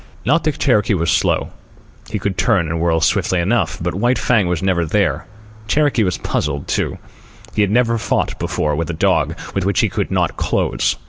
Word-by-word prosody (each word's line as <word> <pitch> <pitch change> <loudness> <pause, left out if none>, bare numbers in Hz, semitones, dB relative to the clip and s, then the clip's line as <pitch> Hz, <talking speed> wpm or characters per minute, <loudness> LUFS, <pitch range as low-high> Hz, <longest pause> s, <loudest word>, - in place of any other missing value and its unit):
Not 165 -1 +2
that 155 -3 0
Cherokee 110 -5 +2
was 85 -2 0
slow. - - +1 0.6
He 105 - -2
could 100 -1 -2
turn 100 -7 +2
and 85 +1 -2
whirl 80 -1 +1
swiftly 90 +2 +1
enough, 95 +1 0
but - - -2
White 120 +7 +1
Fang 110 -7 +2
was 90 0 -1
never 90 -3 +1
there. 85 -2 0 0.4
Cherokee 145 -1 +2
was 90 -4 0
puzzled, 70 -1 -2
too. - - -1 0.6
He 105 - +1
had 100 - +2
never 115 +1 +2
fought - - -1
before 75 -1 -1
with 80 +2 -3
a - - -2
dog 80 - +1 0.2
with 100 - -1
which 100 0 +1
he - - +1
could - - -2
not - - 0
close. - - 0
95 Hz, 195 wpm, -18 LUFS, 85-115 Hz, 0.6 s, Not